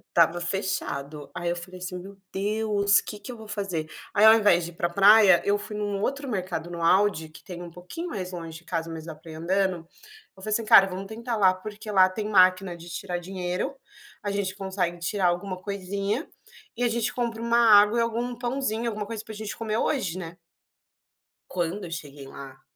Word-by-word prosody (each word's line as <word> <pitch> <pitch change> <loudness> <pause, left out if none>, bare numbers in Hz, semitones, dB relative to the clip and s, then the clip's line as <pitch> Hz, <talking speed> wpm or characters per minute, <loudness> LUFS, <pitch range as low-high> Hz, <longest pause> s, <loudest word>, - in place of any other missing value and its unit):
estava 170 +1 +4
fechado", 155 -5 -3
aí 175 - -2
eu 175 - 0
falei 180 +1 -9
assim: 180 0 -5
"Meu 195 +2 -11 0.2
Deus, 205 0 +2
quê 210 - -8
que - - -11
eu - - -8
vou 220 -1 -11
fazer?". 195 -7 -3 0.3
Aí 210 - +3
ao 220 - +10
invés 205 -6 +4
de 170 - -7
ir - - -19
para 170 - 0
praia, 200 0 +7
eu 205 0 +3
fui 210 +1 -7
em - - -3
um 205 -1 -2
outro 275 +4 -2
mercado, 180 -6 -3
no 170 -1 -5
Audi 185 -2 +3
que 155 - -15
tem 180 -2 -8
um 175 - -7
pouquinho 180 - -7
mais 185 - -4
longe 165 -2 -7
de - - -23
casa, 165 0 -3
mas 160 -1 -7
dá 165 - -6
pra 160 +1 -13
ir - - -8
andando, 185 +2 0 0.6
eu - - -14
falei 215 - -4
assim: 230 - +1
"Cara, 195 -2 +8
vamos 190 +1 -6
tentar 230 +3 -4
lá, 190 -3 +5
porque 210 +3 -8
lá 190 -2 +6
tem 210 +3 -4
máquina 185 -2 +4
de 170 +1 -11
tirar 175 +1 -4
dinheiro, 185 +7 -3 0.5
a 205 - -1
gente 200 -2 -2
consegue 190 -3 -2
tirar 185 +3 -1
alguma 185 +2 -1
coisinha, 200 - -2 0.5
e 245 - -1
a - - +3
gente 235 +1 -1
compra 235 -2 -2
uma 235 0 +2
água 215 0 +6
e - - +4
algum 235 +1 -2
pãozinho, 240 -2 -2
alguma 210 -1 -4
coisa 225 -1 -5
para 220 - -8
gente 215 0 -6
comer 220 -1 -2
hoje, 195 - 0
né?". 170 -1 -8 1.1
Quando 180 +3 -2
eu 170 - -8
cheguei 145 -4 -7
lá, 135 -1 -11
195 Hz, 215 wpm, -26 LUFS, 175-215 Hz, 1.1 s, ao